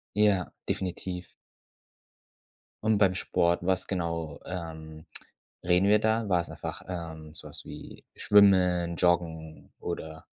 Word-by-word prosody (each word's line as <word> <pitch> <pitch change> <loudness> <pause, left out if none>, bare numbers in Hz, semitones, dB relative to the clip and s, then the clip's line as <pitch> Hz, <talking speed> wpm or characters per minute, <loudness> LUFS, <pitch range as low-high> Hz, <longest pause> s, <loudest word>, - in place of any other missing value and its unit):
Ja, 105 -3 +3 0.2
definitiv. 90 -1 -3 1.6
Und 110 -1 +3
beim 100 -2 +4
Sport, 85 -2 +1
was 95 0 +1
genau, 85 -5 -3
ähm, 80 -3 -7 0.6
reden 90 +2 +3
wir 105 +1 +5
da? 110 0 +1
War's 90 -3 +1
einfach, - - -6
ähm, 80 -3 -6
so 75 - -3
was - - -7
wie - - -10
Schwimmen, 90 -4 +4
Joggen 80 -3 0
oder? 80 -2 -6
90 Hz, 115 wpm, -28 LUFS, 80-95 Hz, 1.6 s, wir